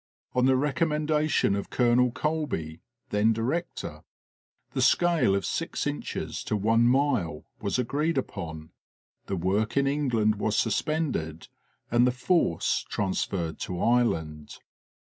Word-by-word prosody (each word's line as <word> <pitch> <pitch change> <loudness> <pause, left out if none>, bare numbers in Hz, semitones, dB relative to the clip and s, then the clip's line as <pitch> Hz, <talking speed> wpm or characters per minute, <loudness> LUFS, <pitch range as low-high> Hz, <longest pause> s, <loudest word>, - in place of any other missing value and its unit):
On 125 0 +3
the 130 - +4
recommendation 150 - +1
of 100 - -4
Colonel 125 0 +3
Colby, 135 - -3 0.3
then 105 +2 +3
director, 135 +11 -3 0.7
the - - -1
scale 170 - +3
of 100 -3 -1
six - - -2
inches - - -4
to 105 - 0
one 115 +3 +3
mile 125 - +1 0.2
was 100 +1 -1
agreed 145 +6 0
upon; 80 -10 -5 0.6
the 100 - -2
work 100 +7 0
in 140 - +4
England 125 -7 +1
was 105 +1 0
suspended 115 - -1 0.4
and 120 +1 +4
the - - +3
force 130 - +1
transferred 95 -4 -2
to 90 -1 -4
Ireland. 80 -11 0
120 Hz, 125 wpm, -27 LUFS, 95-140 Hz, 0.7 s, the